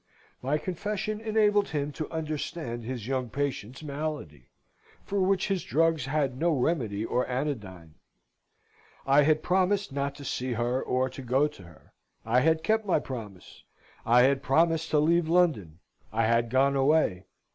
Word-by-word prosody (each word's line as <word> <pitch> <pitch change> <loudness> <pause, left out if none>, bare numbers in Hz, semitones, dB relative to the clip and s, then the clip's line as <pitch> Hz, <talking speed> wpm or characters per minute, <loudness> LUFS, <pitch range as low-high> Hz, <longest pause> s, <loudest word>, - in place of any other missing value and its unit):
My 140 +4 0
confession 205 +5 -3
enabled 210 -2 +2
him 145 -1 -2
to 150 +2 -5
understand 155 -5 -4
his 120 -2 -5
young 130 -1 -2
patient's 135 0 -4
malady; 145 - -5 0.5
for 200 0 -1
which 190 0 +1
his 195 -2 0
drugs 160 -3 +1
had 135 -3 -1
no 170 - +2
remedy 120 -8 -1
or 125 +2 0
anodyne. 105 - -4 1.1
I 140 +2 +5
had 155 +1 +2
promised 190 +1 +1
not 140 0 -2
to 140 0 -10
see 125 -1 -2
her, 120 +3 -1
or 130 +1 0
to 135 - -8
go 130 +4 +2
to 125 -10 -15
her: 85 -2 -18 0.3
I 115 +3 +3
had 160 +3 +2
kept 220 +5 +2
my 195 -4 +2
promise. 110 -10 -9 0.4
I 120 +2 +5
had 135 +1 +3
promised 160 +3 +2
to 155 - +2
leave 160 +2 +3
London: 155 - +2 0.3
I 115 +1 +1
had 115 +1 +2
gone 135 +3 +3
away. 135 - +2
140 Hz, 155 wpm, -28 LUFS, 125-165 Hz, 1.1 s, I